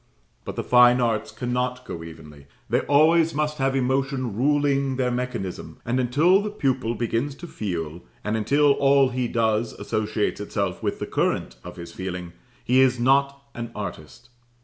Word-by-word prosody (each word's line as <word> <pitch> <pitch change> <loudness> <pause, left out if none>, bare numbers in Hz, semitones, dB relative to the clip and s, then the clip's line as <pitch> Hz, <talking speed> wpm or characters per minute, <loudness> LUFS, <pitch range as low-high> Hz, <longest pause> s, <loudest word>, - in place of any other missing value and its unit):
But - - -5
the - - -3
Fine 125 0 +6
Arts 115 -3 0
cannot 125 +1 -2
go 85 -7 -6
evenly; 75 -3 -12 0.2
they - - +2
always 160 +2 +3
must 150 0 -1
have 135 0 +1
emotion 130 -3 0
ruling 140 +1 +1
their 125 -1 0
mechanism, 120 -7 -4
and 120 +2 0
until 150 +10 +3
the 210 - -3
pupil 130 - -1
begins 120 +5 -2
to 175 - -10
feel, 85 - -5 0.2
and 105 +1 -1
until 140 +6 +3
all 140 -1 +4
he 125 -1 -1
does 110 -1 0
associates 105 -1 -2
itself 100 -3 -3
with - - -2
the - - -4
current - - -1
of 90 - -9
his 85 -1 -9
feeling, 90 -2 -6 0.3
he 130 +2 +3
is 130 -2 +3
not 140 +2 +2
an 115 -1 -5
artist. 105 +4 -8
125 Hz, 165 wpm, -24 LUFS, 105-140 Hz, 0.3 s, Fine